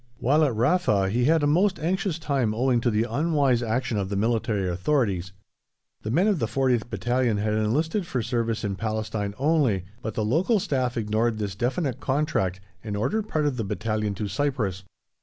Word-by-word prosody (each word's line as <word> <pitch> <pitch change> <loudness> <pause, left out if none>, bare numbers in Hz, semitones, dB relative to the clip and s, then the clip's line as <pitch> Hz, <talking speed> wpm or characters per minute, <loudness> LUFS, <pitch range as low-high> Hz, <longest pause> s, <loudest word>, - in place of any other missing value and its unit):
While 145 +7 +3
at 135 -6 +1
Rafa 115 - +2
he 120 +3 +1
had 160 +1 +3
a - - +4
most 185 +7 +3
anxious 185 +1 -1
time 135 -9 0
owing 125 0 +2
to 120 - +2
the 110 0 +1
unwise 140 -1 +1
action 120 -1 -1
of 95 -1 -3
the 100 - -2
military 110 -2 0
authorities. 95 -1 0 0.7
The 110 - -5
men 165 - +3
of 205 -6 +2
the 115 - 0
40th 125 -2 0
Battalion 120 -3 0
had 105 +1 0
enlisted 155 - 0
for 125 -7 -2
service 115 -1 -1
in 100 -2 -2
Palestine 110 -2 -3
only, 135 - +2 0.2
but 110 -3 -5
the 110 - 0
local 175 - +2
Staff 130 - -1
ignored 110 +1 0
this 105 -3 -3
definite 130 - -1
contract 130 -10 0 0.2
and 105 -2 -4
ordered 180 - -1
part 155 -1 0
of 140 -4 0
the 115 - -1
battalion 105 0 -2
to 105 +2 -3
Cyprus. 110 -8 -1
120 Hz, 185 wpm, -25 LUFS, 105-145 Hz, 0.7 s, a